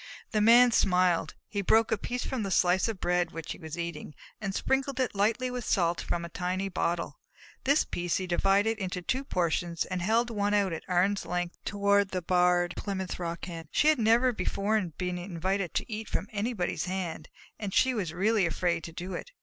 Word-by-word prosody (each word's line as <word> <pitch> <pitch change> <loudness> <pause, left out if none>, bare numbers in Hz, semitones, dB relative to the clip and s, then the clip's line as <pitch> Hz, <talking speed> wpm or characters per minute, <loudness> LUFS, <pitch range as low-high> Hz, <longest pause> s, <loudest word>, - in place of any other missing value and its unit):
The 215 - +1
Man 240 +3 +7
smiled. 180 -6 +2
He 205 - -2
broke 220 +4 +3
a - - +4
piece 245 0 -3
from 260 -3 -2
the 200 - -2
slice 185 +1 +3
of 220 -4 -4
bread 180 0 +1
which 165 -1 -7
he - - -6
was 160 0 -7
eating, 170 -3 -5 0.3
and 195 -2 -3
sprinkled 270 0 0
it 255 -3 0
lightly 225 +5 +1
with 250 -1 -4
salt 170 -5 +1
from 170 0 -2
a - - -8
tiny 185 +3 -2
bottle. 175 -2 -2 0.5
This 280 +3 +4
piece 175 -1 -1
he 185 - -3
divided 195 +5 +2
into 180 -2 -3
two 260 +8 -1
portions 170 -6 -1
and 185 -1 -3
held 230 +5 +2
one 205 -1 +1
out 195 -4 +2
at 160 - -4
arm's 190 +3 +2
length 175 0 -3
toward 200 -1 +2
the 185 -2 -3
Barred 180 0 +3
Plymouth 190 -3 -4
Rock 170 -1 -4
Hen. 165 -3 -7
She 300 - +3
had 310 - +3
never 235 +3 +4
before 210 +2 0 0.2
been 180 -1 -2
invited 185 +1 -2
to - - -2
eat 220 +1 -5
from 195 - -2
anybody's 210 -4 -2
hand, 180 -4 -4 0.3
and 205 -3 -4
she 260 +6 +3
was 195 -8 -2
really 195 +2 +2
afraid 170 0 -1
to 165 - -7
do 180 +3 -6
it. - - -6
190 Hz, 200 wpm, -29 LUFS, 175-220 Hz, 0.5 s, Man